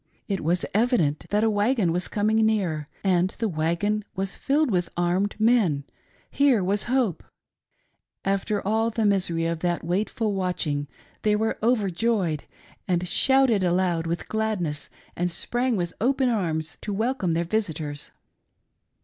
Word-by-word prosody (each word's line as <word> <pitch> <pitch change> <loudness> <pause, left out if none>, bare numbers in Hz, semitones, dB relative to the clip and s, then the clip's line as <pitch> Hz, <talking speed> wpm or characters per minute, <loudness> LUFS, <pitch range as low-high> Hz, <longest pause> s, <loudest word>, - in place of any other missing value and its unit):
It 195 -2 -2
was 175 +3 +1
evident 205 - +1
that 210 +1 +2
a 225 - +4
wagon 205 -3 +2
was 180 +2 -1
coming 215 +1 +1
near, 185 -9 0 0.2
and 185 -2 +3
the 225 - 0
wagon 175 +5 0
was 190 +1 -3
filled 290 -1 +1
with 175 -3 0
armed 180 +3 +1
men; 215 -11 +3 0.2
— - - -35
here 270 -8 +3
was 200 +2 0
hope. 240 -8 0 1.0
After 195 +1 0
all 220 +2 +2
the 225 -1 -1
misery 180 -5 +1
of 165 -1 -1
that 175 0 -1
waitful 205 +5 -1
watching, 175 -6 -1 0.3
they 210 -1 +2
were 220 +1 -1
overjoyed, 205 - +1 0.4
and 180 -1 0
shouted 265 -3 +4
aloud 175 -2 +1
with 170 +1 -3
gladness, 205 -9 -2 0.3
and 175 +1 0
sprang 240 +8 -1
with 175 -3 -2
open 260 +2 +2
arms 160 -8 -2
to 210 - -4
welcome 220 -4 0
their 170 +1 +1
visitors. 160 -7 -3
195 Hz, 145 wpm, -25 LUFS, 170-220 Hz, 1.0 s, a